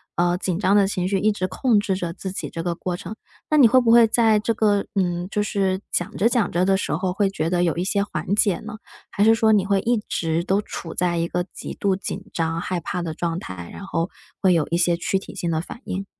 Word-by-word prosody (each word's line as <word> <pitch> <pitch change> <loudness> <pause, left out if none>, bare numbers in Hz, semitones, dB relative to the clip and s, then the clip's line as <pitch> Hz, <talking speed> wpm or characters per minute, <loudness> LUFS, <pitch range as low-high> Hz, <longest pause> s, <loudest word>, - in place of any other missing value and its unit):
呃， 175 0 +2
紧 180 -2 -2
张 200 -1 +3
的 200 -2 +5
情 185 -2 -1
绪 195 0 +1
一 215 +3 +3
直 185 -3 -2
控 220 +4 +2
制 200 -2 -1
着 175 -3 -4
自 190 +2 -6
己 - - -5
这 165 - -5
个 175 0 -1
过 180 +1 -3
程。 180 +4 -7 0.3
那 305 - +3
你 260 -6 +8
会 255 +2 +5
不 230 - +3
会 235 -1 +7
在 220 -1 +3
这 225 +2 0
个， 205 -2 +2
嗯， 175 -2 0
就 210 0 0
是 195 -2 0
讲 175 - -2
着 225 - +3
讲 240 -3 +1
着 175 - +1
的 190 +1 +3
时 - - -2
候 180 +3 -1
会 195 +1 +1
觉 165 -4 -2
得 175 0 +1
有 170 -3 +1
一 175 - -1
些 200 +1 0
缓 180 -1 -3
解 200 -4 +2
呢， 215 0 -8 0.3
还 200 - 0
是 225 +1 +6
说 220 -1 +3
你 205 -3 +3
会 200 -1 +2
一 235 +2 +1
直 165 0 -1
都 195 +3 +1
处 165 -5 -7
在 175 -1 0
一 165 - 0
个 180 +1 -1
极 - - -7
度 195 -2 0
紧 195 0 -5
张、 165 0 -1
害 180 -1 -2
怕 180 +1 -4
的 165 -2 -4
状 170 +1 -2
态， 90 - -8
然 200 - -8
后 170 -2 -2 0.3
会 185 -2 +4
有 165 -3 +2
一 170 - +1
些 175 0 +3
躯 180 +3 -1
体 - - -11
性 170 - -2
的 160 - 0
反 230 +9 -8
应？ 195 +1 -4
190 Hz, 285 characters per minute, -23 LUFS, 175-205 Hz, 0.3 s, 你